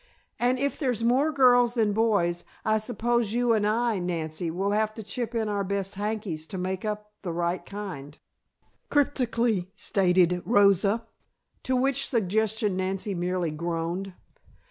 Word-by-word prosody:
"And 245 +2 +2
if 280 +2 -1
there's 250 -6 0
more 260 +6 +3
girls 245 -3 +4
than 215 -3 +2
boys 200 -6 +1 0.2
I 215 0 +3
suppose 235 0 -1
you 240 -1 +2
and 210 -2 +2
I, 225 -1 +1
Nancy, 165 -1 -3
will 190 +5 -1
have 215 +1 0
to 220 - -7
chip 235 +3 -4
in 225 -1 0
our 205 -1 -1
best 195 0 -2
hankies 200 -6 -3
to 190 - -6
make 185 +1 -3
up 210 0 -4
the 180 - -4
right 170 +1 -1
kind," 180 -8 -7 0.7
cryptically 235 -9 +1
stated 180 -3 +2
Rosa. 205 0 +3 0.6
To 260 - 0
which 270 +1 +1
suggestion 215 -2 0
Nancy 190 +2 -2
merely 180 -2 -1
groaned. 170 +4 -3
210 Hz, 145 wpm, -27 LUFS, 180-235 Hz, 0.7 s, girls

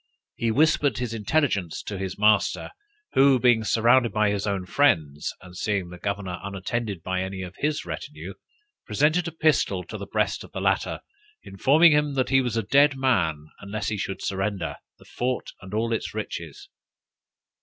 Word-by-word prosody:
He 115 - -1
whispered 145 0 +3
his 125 -2 -3
intelligence 105 - 0
to 105 - -5
his 95 -1 -4
master, 105 -1 +2 0.4
who 135 -1 +5
being 120 -2 +4
surrounded 120 +2 +3
by 105 -1 +2
his 100 0 -2
own 100 -2 -1
friends, 80 - +1
and 90 -1 -13
seeing 95 -2 -1
the 90 - -10
governor 100 -2 -3
unattended 100 -1 -4
by 95 0 -1
any 95 0 -4
of 90 0 -8
his 150 +1 -1
retinue, - - -7 0.5
presented 155 +4 +1
a - - -4
pistol 155 -1 +1
to - - -8
the - - -7
breast - - -1
of - - -15
the - - -4
latter, - - 0 0.4
informing 150 - +4
him 150 -1 +2
that 130 -1 0
he 135 0 +4
was 120 -3 -2
a 115 - 0
dead 140 +6 +4
man, 85 - +1
unless 105 +1 -4
he 105 - -2
should 95 - -4
surrender 95 -6 -2 0.2
the - - -19
fort 125 +1 -3
and 95 -1 -11
all 115 +2 0
its 115 - -3
riches. - - -6
110 Hz, 175 wpm, -25 LUFS, 95-135 Hz, 0.5 s, who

